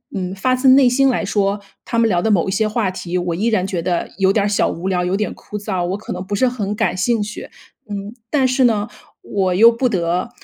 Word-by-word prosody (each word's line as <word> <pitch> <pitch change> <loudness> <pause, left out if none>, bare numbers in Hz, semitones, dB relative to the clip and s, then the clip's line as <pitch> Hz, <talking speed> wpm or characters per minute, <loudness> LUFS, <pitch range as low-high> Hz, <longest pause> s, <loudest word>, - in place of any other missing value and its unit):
嗯， 185 -1 -3
发 255 +6 +1
自 255 +1 +1
内 260 -1 +7
心 270 +2 +3
来 240 - 0
说， 200 0 0 0.3
他 230 - -3
们 230 - +4
聊 175 -4 +1
的 220 - 0
某 185 -2 +2
一 - - -1
些 215 +3 +1
话 215 -2 0
题， 180 -1 -4
我 175 -1 -2
依 215 +6 -1
然 205 -5 +1
觉 185 -3 -3
得 175 0 -2
有 190 0 +4
点 200 -1 +1
儿 - - +1
小 205 - +1
无 175 +3 -5
聊、 180 -2 0
有 180 +2 0
点 210 - -2
枯 210 - -8
燥， 195 -4 -3
我 190 +2 -2
可 215 - -7
能 180 0 -5
不 205 +2 -3
是 255 +4 +2
很 210 -5 -3
感 215 -4 0
兴 225 +5 +1
趣， 210 +1 -7 0.4
嗯。 200 +1 -5 0.2
但 265 -1 +2
是 255 +1 +2
呢， 215 -2 +1 0.4
我 190 -3 -1
又 230 +5 +7
不 250 +2 0
得 180 +1 -1
205 Hz, 275 characters per minute, -19 LUFS, 185-230 Hz, 0.4 s, 内